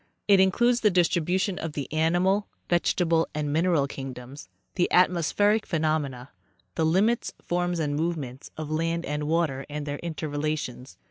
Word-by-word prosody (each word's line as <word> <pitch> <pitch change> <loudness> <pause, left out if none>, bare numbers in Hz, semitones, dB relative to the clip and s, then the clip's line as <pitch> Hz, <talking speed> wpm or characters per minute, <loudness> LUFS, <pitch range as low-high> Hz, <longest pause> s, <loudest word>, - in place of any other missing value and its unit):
It 200 -2 +6
includes 240 +6 +3
the 210 - +5
distribution 180 +1 +1
of 165 -2 -4
the 145 -2 -4
animal, 175 +6 +2 0.2
vegetal 170 -1 +2
and 150 -1 -1
mineral 165 -3 +2
kingdoms; 135 0 -8 0.2
the 175 - 0
atmospheric 185 +4 +3
phenomena; 155 -6 -2 0.4
the 160 - +1
limits, 205 +8 +1
forms 175 0 -1
and 150 -3 -1
movements 150 -5 -3
of 155 -1 -5
land 165 +2 -1
and 150 0 -3
water 155 -4 0
and 145 0 -4
their 145 0 -4
interrelations. 150 -5 -4
160 Hz, 140 wpm, -26 LUFS, 145-180 Hz, 0.4 s, It